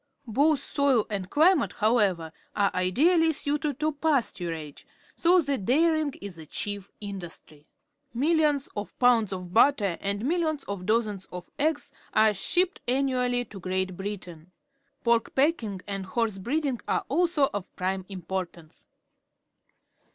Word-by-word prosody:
Both 280 +6 +2
soil 275 -6 +2
and 190 -3 -3
cUmate, 320 - +4
however, 200 -8 +1 0.2
are 200 -1 +2
ideally 320 - +3
suited 290 -1 -2
to 310 +1 +2
pasturage, 180 - -2 0.3
so 355 +1 +4
that 275 - -1
dairying 310 - +2
is 195 -3 -7
the 160 -1 -10
chief 200 +2 -4
industry. 175 -7 -8 0.5
MilUons 295 0 +2
of 205 0 -6
pounds 240 -5 +4
of 180 -2 -6
butter 220 -7 +3
and 200 +1 -2
milUons 315 0 0
of 200 -2 -5
dozens 215 -4 0
of 180 -1 -9
eggs 310 +1 0 0.2
are 215 -1 +5
shipped 360 - 0
annually 250 -1 +1
to 200 - -10
Great 185 0 -2
Britairu 180 -4 -7 0.6
_Pork 235 -1 +2
packing 255 - +1
and 195 -2 -4
horse 220 -1 -1
breeding 270 +3 -1
are - - 0
also 325 -2 +2
of 200 -2 -5
prime 190 0 -2
importance. 180 -3 -6
225 Hz, 130 wpm, -27 LUFS, 190-285 Hz, 0.6 s, are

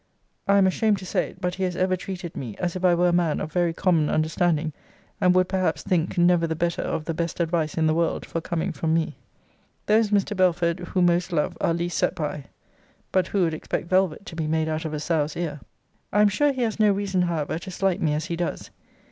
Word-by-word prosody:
I 200 0 +5
am 195 - +5
ashamed 210 +2 +2
to 185 - -9
say - - -1
it; 185 - -17
but 180 -1 -1
he 190 - -3
has 180 -1 -1
ever 185 +1 +1
treated 180 -2 -7
me 120 -6 -5
as 175 -1 -2
if 185 - -5
I 180 -1 +5
were 175 +1 +3
a - - +1
man 170 -3 +1
of 155 - -4
very 175 -1 +2
common 165 -3 +2
understanding; 155 0 +1 0.5
and 180 0 +4
would, 185 0 +4
perhaps, 180 -6 0
think 175 -1 0
never 175 -1 +4
the 160 - -2
better 170 +1 -1
of 155 - -3
the 165 - -2
best 170 +2 -3
advice 165 -2 0
in 160 - +1
the 155 - +3
world 165 0 0
for 165 - -4
coming 170 +2 -2
from 160 0 0
me. 165 -1 -1 0.7
Those, 215 0 +3
Mr. 205 0 +1
Belford, 175 -2 +2
who 180 +1 -1
most 175 +1 +2
love, 150 -3 0
are 165 - +2
least 170 0 -2
set - - +1
by. 150 -3 -4 0.7
But 185 -2 +2
who 195 -2 +1
would 165 -2 +1
expect 155 +1 -4
velvet 190 0 +1
to 170 - -9
be 160 -2 -2
made 160 0 0
out 155 +1 -2
of 155 - -4
a - - -3
sow's 155 -1 -1
ear? 160 -4 -3 0.5
I 210 - +3
am 210 - +6
sure 290 +9 +2
he 260 -2 -2
has 225 -1 -2
no 210 -1 +5
reason 195 -2 0
however 165 -3 -1
to 180 - -9
slight 190 0 0
me 150 -2 +1
as 155 - -2
he 170 - -3
does. 175 0 -4
175 Hz, 240 wpm, -24 LUFS, 160-185 Hz, 0.7 s, am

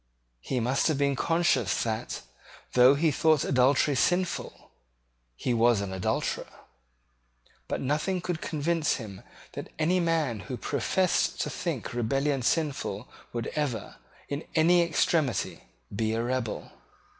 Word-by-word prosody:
He 125 - -2
must 125 +3 +1
have 155 -3 +1
been 140 -1 +2
conscious 165 -4 +1
that, 115 +1 -3 0.5
though 125 +2 +7
he 155 +2 +2
thought 155 +1 +3
adultery 135 +3 +3
sinful, 180 +6 -1 0.6
he 120 - -1
was 115 -1 +4
an 100 -1 -4
adulterer: 95 -1 -1 1.2
but - - -2
nothing 150 +7 0
could 175 -2 -3
convince 160 +1 0
him 100 -6 -8 0.3
that - - -7
any 170 +4 +2
man 160 -9 0
who 125 - -3
professed 185 +7 0
to - - -2
think 165 - -4
rebellion 135 +4 0
sinful 150 +3 -1 0.2
would 120 -1 -3
ever, 145 -7 -3 0.3
in 145 +2 -4
any 170 +2 +5
extremity, 160 -4 0 0.3
be 110 +1 0
a 115 +1 0
rebel. 125 -2 -3
140 Hz, 130 wpm, -28 LUFS, 120-160 Hz, 1.2 s, though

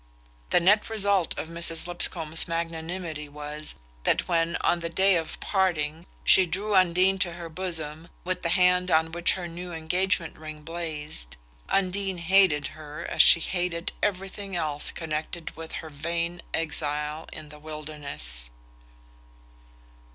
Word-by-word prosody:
The - - +5
net 205 +6 +4
result 200 -5 +2
of - - -3
Mrs. 165 0 +2
Lipscomb's 165 -2 +1
magnanimity 165 -2 -4
was 150 +1 -5 0.3
that - - +1
when, 170 -1 +1
on 175 - +2
the 170 0 -3
day 190 +3 +4
of 165 -2 -3
parting, 170 -4 0 0.2
she 190 -1 +6
drew 200 +5 -2
Undine 185 +1 +4
to 175 -2 +1
her 170 -1 -7
bosom 160 -2 -3 0.2
with 185 0 -2
the 170 - 0
hand 180 +1 +4
on 160 -1 +3
which 175 +1 +3
her 180 -2 -4
new 175 +1 -7
engagement 170 +1 0
ring 155 -1 -8
blazed, 155 - -4 0.3
Undine 195 0 0
hated 170 -4 +4
her 155 +1 -8
as - - +5
she - - +8
hated 175 -1 -2
everything 195 0 -2
else 155 -3 -1
connected 160 +1 -5
with 165 0 -8
her 160 - -6
vain 170 +3 -2
exile 150 -1 -2
in 150 - -8
the 150 0 -12
wilderness. 150 - -4
170 Hz, 140 wpm, -27 LUFS, 155-180 Hz, 0.3 s, she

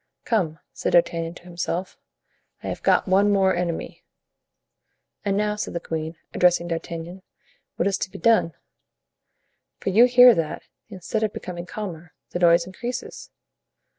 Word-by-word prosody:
"Come," 175 -9 0 0.2
said - - -2
D'Artagnan 170 -1 +2
to - - -14
himself, 175 +1 -4 0.7
"I - - -4
have - - -5
got - - +3
one 195 +2 +4
more 190 -2 +3
enemy." 175 -1 -4 1.2
"And 200 -1 0
now," 210 0 0
said 210 - -5
the - - 0
queen, 160 0 -4 0.2
addressing 175 -1 +3
D'Artagnan, 170 +2 -5 0.5
"what 175 - 0
is 195 - 0
to - - -3
be - - -10
done? 220 -9 +3 1.2
for 195 - -3
you 225 +6 +7
hear 250 0 +8
that, 165 -6 -3 0.3
instead 190 +4 -4
of 215 -2 0
becoming 175 -1 -7
calmer, 175 -6 -7 0.2
the 175 - -3
noise 170 -1 +5
increases." 240 +7 -6
180 Hz, 145 wpm, -24 LUFS, 170-205 Hz, 1.2 s, hear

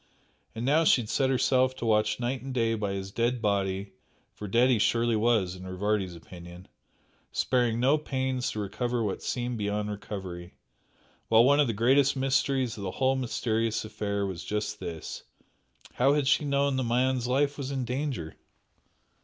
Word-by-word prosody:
And 115 +2 -4
now 150 +5 +4
she 135 - +4
had 105 - -10
set 130 +3 +1
herself 130 0 +2
to 120 - -5
watch 105 0 +2
night 125 +2 -2
and 135 +1 -6
day 115 -2 +2
by 105 -3 -2
his 95 0 -5
dead 120 +3 0
body 100 -2 -1 0.4
(for 105 - -7
dead 120 +6 +3
he 120 - +3
surely 115 +2 +2
was 110 -5 +1
in 90 - -11
Rivardi's 95 -1 -1
opinion) 85 +2 -12 0.6
sparing 120 -3 +1
no 135 +5 +3
pains 130 -3 -2
to 110 - -5
recover 120 +4 -2
what 100 -3 -3
seemed 120 -2 -3
beyond 105 0 -2
recovery; 95 -4 -7 0.7
while 115 +1 +6
one 140 +3 +4
of 145 - +4
the 115 - -1
greatest 130 +6 +3
mysteries 135 -2 0
of - - -7
the 95 - -2
whole 135 0 +2
mysterious 115 -3 -1
affair 100 -2 -2
was 95 -3 -5
just 105 0 -3
this 85 -4 -6 0.7
How 135 +3 +3
had 145 -2 0
she 150 +1 +3
known 140 -1 +1
the 130 - 0
man's 125 +1 +1
life 140 +3 +1
was 140 -2 -5
in 135 -2 -2
danger? 125 - -3
115 Hz, 175 wpm, -28 LUFS, 105-130 Hz, 0.7 s, while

